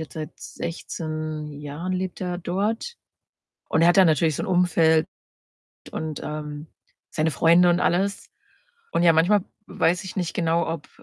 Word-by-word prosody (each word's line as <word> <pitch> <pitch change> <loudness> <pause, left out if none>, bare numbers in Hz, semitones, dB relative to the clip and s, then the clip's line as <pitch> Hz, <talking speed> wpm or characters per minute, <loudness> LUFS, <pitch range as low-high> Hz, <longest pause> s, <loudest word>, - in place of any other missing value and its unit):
jetzt 160 - -7
seit 155 -1 -5
16 155 -2 -5
Jahren 150 +5 -5
lebt 185 0 -3
er 180 -1 -3
dort. 210 - -2 0.7
Und 160 - +2
er - - +6
hat 175 - +3
da 190 - +8
natürlich 155 -1 +2
so - - -2
'n - - -5
Umfeld 165 -3 +3 0.9
und, 155 -2 -4
ähm, 150 0 -6 0.4
seine 160 +1 0
Freunde 170 +4 +5
und 175 - +2
alles. 195 +3 0 0.6
Und, - - +1
ja, 170 - +7
manchmal 180 +6 +3 0.2
weiß 175 +3 0
ich 190 - -8
nicht 180 -3 -2
genau, 165 0 +1
ob 165 -2 -5
165 Hz, 160 wpm, -24 LUFS, 155-180 Hz, 0.9 s, da